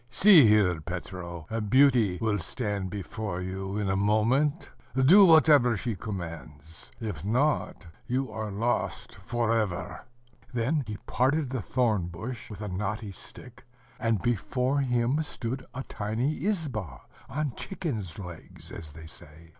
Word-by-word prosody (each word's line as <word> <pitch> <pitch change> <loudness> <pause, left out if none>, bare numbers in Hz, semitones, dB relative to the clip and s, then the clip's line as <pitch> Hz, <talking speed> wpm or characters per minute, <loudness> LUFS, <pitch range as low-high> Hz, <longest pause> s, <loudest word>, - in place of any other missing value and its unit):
"See 165 - +7
here, 95 -6 +4
Petro: 85 -1 -6
a 115 0 -1
beauty 120 -4 +4
will 110 -2 0
stand 100 +1 -3
before 100 -1 -4
you 95 +2 -4
in 105 -2 -1
a 95 - +1
moment; 115 - +1 0.2
do 175 +10 +7
whatever 150 -8 +6
she 115 0 -3
commands; 80 -6 -8
if 105 -9 -5
not 125 +6 0 0.2
you 130 0 -1
are 110 0 -4
lost 115 +5 -2
for 115 -1 -1
ever." 105 -6 -2 0.5
Then 130 +5 0
he 105 -1 -5
parted 135 +2 +1
the 130 -4 -2
thorn 110 -9 +1
bush 110 +8 -7
with 105 -1 -7
a - - -4
knotty 100 +3 -3
stick, 120 +5 -11 0.4
and 115 -3 +1
before 125 +4 0
him 125 +2 +1
stood 130 -3 -5
a 130 +2 -5
tiny 115 +9 -2
izba, 120 - -2 0.3
on 145 -1 -2
chicken's 120 - -5
legs, 90 -4 -10
as 75 -3 -8
they 80 +1 -11
say. 80 +1 -11
110 Hz, 140 wpm, -28 LUFS, 95-130 Hz, 0.5 s, See